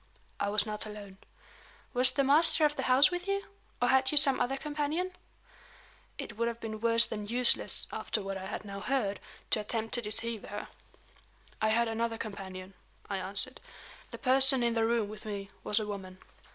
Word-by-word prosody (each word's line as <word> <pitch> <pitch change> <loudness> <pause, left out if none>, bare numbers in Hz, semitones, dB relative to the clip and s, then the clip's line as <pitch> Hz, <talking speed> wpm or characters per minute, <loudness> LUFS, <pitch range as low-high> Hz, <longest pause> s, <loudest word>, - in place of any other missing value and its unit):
"I 200 - -1
was 210 +1 +2
not 215 0 -5
alone." 200 -2 -11 0.7
"Was 250 0 +5
the 275 +2 0
master 310 +3 +4
of 295 0 0
the - - -3
house 265 +7 +5
with 355 +1 -5
you? 395 0 -2 0.3
or 245 - +1
had 265 0 +3
you 300 - 0
some 275 -2 +6
other 270 +2 -1
companion?" 300 +5 -3 1.0
It 215 - -7
would 235 +1 0
have 235 0 -4
been 220 -2 -7
worse 230 0 +8
than 210 -1 -6
useless 245 +2 +2
(after - - -3
what 195 0 -5
I 190 0 -7
had - - -6
now 200 -1 -7
heard) 210 -3 -2 0.3
to - - +2
attempt 225 +1 -4
to 240 - 0
deceive 225 0 -2
her. 205 +1 -7 0.9
"I 215 - +2
had 235 +2 +2
another 225 0 -2
companion," 190 -3 -8 0.4
I 200 - -1
answered. 195 +7 -2 0.5
"The - - -9
person 265 0 +5
in 235 -1 +1
the 225 -1 +1
room 230 -2 0
with 215 +1 -10
me 200 -2 -7
was 210 - +2
a 215 - -3
woman." 190 -3 -8
230 Hz, 190 wpm, -30 LUFS, 210-265 Hz, 1.0 s, worse